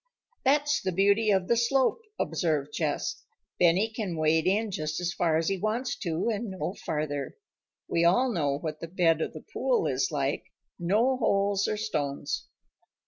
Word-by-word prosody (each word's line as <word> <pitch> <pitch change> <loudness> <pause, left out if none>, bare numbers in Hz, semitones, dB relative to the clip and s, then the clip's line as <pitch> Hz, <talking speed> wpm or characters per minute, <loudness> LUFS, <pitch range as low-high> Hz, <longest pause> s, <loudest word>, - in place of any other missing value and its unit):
"That's 295 +2 +3
the 185 - -1
beauty 200 +4 +3
of 190 -2 +2
the 235 - +3
slope," 260 - +2 0.2
observed 150 -4 -1
Jess. - - -2 0.4
"Benny 180 +5 +4
can 215 -7 -4
wade 155 +1 +2
in 210 +3 +1
just 155 -3 -3
as 175 0 -2
far 165 -2 +2
as 160 - 0
he 195 -1 0
wants 240 +5 -1
to, 170 -1 -2
and 225 0 -2
no 190 -1 -3
farther. 150 -2 -3 0.5
We 170 - +1
all 245 +10 +4
know 145 -8 0
what 155 0 -5
the 165 - -6
bed 165 -2 +2
of - - -2
the - - -10
pool 485 -4 +1
is - - 0
like - - -1 0.3
no 220 +9 +2
holes 200 -4 +1
or 215 - -1
stones." 145 -10 -3
190 Hz, 170 wpm, -28 LUFS, 160-225 Hz, 0.5 s, Benny